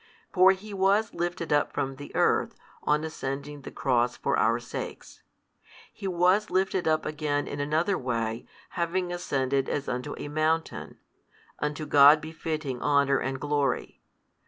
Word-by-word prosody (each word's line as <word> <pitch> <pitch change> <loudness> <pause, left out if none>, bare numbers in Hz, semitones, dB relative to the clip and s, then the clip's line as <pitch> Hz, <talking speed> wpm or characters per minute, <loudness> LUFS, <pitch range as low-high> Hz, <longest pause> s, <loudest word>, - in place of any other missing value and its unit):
For 185 0 +7
He 205 +2 -6
was 200 +3 +2
lifted 170 -2 -2
up 145 - +1
from 135 0 -2
the 145 - -9
earth, - - +2 0.3
on 150 +1 +1
ascending 145 -1 -5
the - - -8
Cross 120 -2 0
for - - 0
our - - +2
sakes; - - -7 0.7
He 195 - -6
was 185 +4 +2
lifted 185 -1 0
up 155 0 +2
again 150 -1 -1
in 145 - -5
another 160 +7 0
way 115 -3 -2 0.2
having 175 +1 -2
ascended 135 -6 -1
as 145 - -2
unto 125 +4 -3
a - - -6
mountain, 155 +2 -1 0.6
unto 150 +1 -2
God 145 +1 +7
befitting 155 -4 -4
honour 140 -1 +3
and 135 0 -3
glory. 145 -2 -1
150 Hz, 145 wpm, -27 LUFS, 140-175 Hz, 0.7 s, For